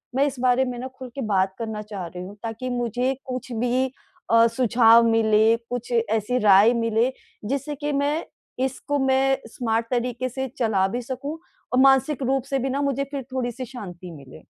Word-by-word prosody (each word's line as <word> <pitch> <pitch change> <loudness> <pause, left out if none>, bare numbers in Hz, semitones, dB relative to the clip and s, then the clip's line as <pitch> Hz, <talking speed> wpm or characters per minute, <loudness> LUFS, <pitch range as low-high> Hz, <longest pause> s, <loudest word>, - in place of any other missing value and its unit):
मैं 275 +2 +3
इस 270 -2 -5
बारे 255 +1 +3
में 250 -1 -4
ना 255 - -4
खुल 255 - -7
के 275 - -4
बात 190 -3 +1
करना 220 -2 -4
चाह 205 -4 -6
रही 180 +1 -8
हूँ 195 +3 -9
ताकि 230 +3 -4
मुझे 245 +1 -1
कुछ 255 0 -5
भी 250 +3 0 0.4
अ, 230 0 +6
सुझाव 230 -1 +5
मिले, 220 0 +4
कुछ 245 0 -5
ऐसी 225 +1 0
राय 210 +2 +6
मिले 230 +1 +1 0.4
जिससे 280 +2 -2
कि 295 +1 -3
मैं, 285 +3 0 0.4
इसको 280 +2 -2
मैं 265 0 +3
स्मार्ट 230 -1 -1
तरीके 245 +1 -1
से 265 +2 -4
चला 210 -5 +2
भी 240 +6 -3
सकूँ 265 +5 -5 0.4
और 250 - +4
मानसिक 270 +1 +4
रूप 265 0 +1
से 275 - 0
भी 265 +1 -1
ना 275 +2 -1
मुझे 275 -1 0
फिर 280 -2 -4
थोड़ी-सी 255 0 -3
शांति 185 -8 -9
मिले। 140 -3 -13
245 Hz, 185 wpm, -24 LUFS, 225-265 Hz, 0.4 s, अ